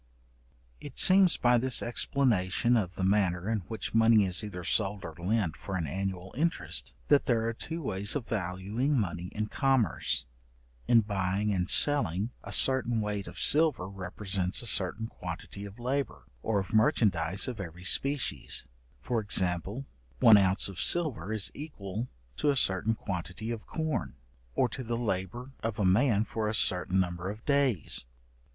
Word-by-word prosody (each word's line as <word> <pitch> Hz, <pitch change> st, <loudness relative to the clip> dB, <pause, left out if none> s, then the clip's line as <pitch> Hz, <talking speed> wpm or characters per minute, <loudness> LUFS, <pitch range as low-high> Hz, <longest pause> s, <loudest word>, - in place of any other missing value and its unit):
It -, -, -10 dB
seems 185 Hz, -2 st, +6 dB
by 120 Hz, 0 st, +3 dB
this 130 Hz, 0 st, 0 dB
explanation 120 Hz, -3 st, +1 dB
of 95 Hz, -6 st, -1 dB
the 95 Hz, -, -3 dB
manner 95 Hz, -2 st, +1 dB
in 110 Hz, -1 st, 0 dB
which 110 Hz, -1 st, -4 dB
money 115 Hz, -2 st, +5 dB
is 90 Hz, +3 st, -2 dB
either 90 Hz, -4 st, -6 dB
sold 100 Hz, +3 st, +1 dB
or 80 Hz, -, -7 dB
lent 95 Hz, -2 st, 0 dB
for 95 Hz, -, -6 dB
an 85 Hz, -3 st, -1 dB
annual 95 Hz, +3 st, -4 dB
interest, 165 Hz, +5 st, -1 dB
that 145 Hz, -1 st, +4 dB
there 115 Hz, -2 st, +1 dB
are 115 Hz, -, -1 dB
two 165 Hz, +8 st, -6 dB
ways 100 Hz, -1 st, -2 dB
of 135 Hz, -5 st, -2 dB
valuing 105 Hz, +8 st, -1 dB
money 90 Hz, -3 st, -3 dB
in 105 Hz, +2 st, -3 dB
commerce. 130 Hz, -, 0 dB, 0.6 s
In 115 Hz, -2 st, +6 dB
buying 100 Hz, 0 st, -1 dB
and 90 Hz, -2 st, -1 dB
selling, 115 Hz, -, +4 dB
a -, -, -8 dB
certain 120 Hz, -3 st, +3 dB
weight 105 Hz, -2 st, -3 dB
of -, -, -10 dB
silver 150 Hz, -, +2 dB
represents 95 Hz, +1 st, -2 dB
a -, -, -6 dB
certain 105 Hz, +1 st, 0 dB
quantity 90 Hz, 0 st, -8 dB
of 100 Hz, 0 st, -11 dB
labour, 130 Hz, +3 st, -3 dB, 0.2 s
or 110 Hz, -, 0 dB
of 95 Hz, +4 st, -6 dB
merchandize 95 Hz, -5 st, +2 dB
of 125 Hz, -4 st, -5 dB
every 85 Hz, -2 st, -8 dB
species; 140 Hz, +8 st, 0 dB, 0.4 s
for 120 Hz, -2 st, 0 dB
example, 100 Hz, +4 st, 0 dB, 0.3 s
one 115 Hz, -, +8 dB
ounce 95 Hz, -1 st, +3 dB
of 95 Hz, -2 st, -6 dB
silver 155 Hz, -, +2 dB
is 110 Hz, -3 st, -2 dB
equal 115 Hz, -7 st, -6 dB, 0.3 s
to 150 Hz, -, +1 dB
a 140 Hz, -, +2 dB
certain 110 Hz, -2 st, +2 dB
quantity 95 Hz, +3 st, -5 dB
of 115 Hz, -2 st, -6 dB
corn, 160 Hz, -, -3 dB, 0.4 s
or -, -, +3 dB
to 130 Hz, +3 st, -7 dB
the 120 Hz, 0 st, -3 dB
labour 115 Hz, +3 st, -3 dB
of 115 Hz, -1 st, -3 dB
a 105 Hz, -, 0 dB
man 105 Hz, +3 st, +3 dB
for 110 Hz, -1 st, -3 dB
a 105 Hz, -, 0 dB
certain 90 Hz, -1 st, +1 dB
number 90 Hz, 0 st, -2 dB
of 105 Hz, +2 st, -8 dB
days. 135 Hz, -, +1 dB
105 Hz, 165 wpm, -29 LUFS, 95-120 Hz, 0.6 s, one